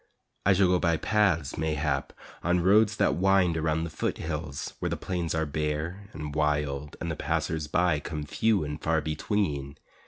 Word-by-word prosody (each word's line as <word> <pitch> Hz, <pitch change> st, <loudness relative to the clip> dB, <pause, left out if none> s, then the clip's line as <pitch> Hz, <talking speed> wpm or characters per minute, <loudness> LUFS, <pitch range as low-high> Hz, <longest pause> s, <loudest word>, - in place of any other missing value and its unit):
I 100 Hz, -, +7 dB
shall 95 Hz, +1 st, +4 dB
go 90 Hz, 0 st, +3 dB
by 85 Hz, -2 st, +2 dB
paths, 90 Hz, -12 st, +1 dB
mayhap, 75 Hz, -3 st, -1 dB, 0.3 s
On 90 Hz, +1 st, +2 dB
roads 105 Hz, +4 st, +4 dB
that -, -, +2 dB
wind 95 Hz, -2 st, +3 dB
around 80 Hz, 0 st, 0 dB
the 85 Hz, -, -4 dB
foothills 75 Hz, -3 st, -3 dB
Where -, -, -1 dB
the -, -, -2 dB
plains 85 Hz, -3 st, -2 dB
are 80 Hz, 0 st, +1 dB
bare 75 Hz, +6 st, -3 dB
and 75 Hz, -5 st, -6 dB
wild 75 Hz, -1 st, -1 dB
And 85 Hz, -, -3 dB
the -, -, -2 dB
passers 80 Hz, -1 st, -1 dB
by 85 Hz, 0 st, +2 dB
come 75 Hz, 0 st, -5 dB
few 105 Hz, +5 st, +1 dB
and 75 Hz, +1 st, -5 dB
far 80 Hz, -1 st, +1 dB
between. 75 Hz, -3 st, -2 dB
80 Hz, 175 wpm, -28 LUFS, 75-90 Hz, 0.3 s, I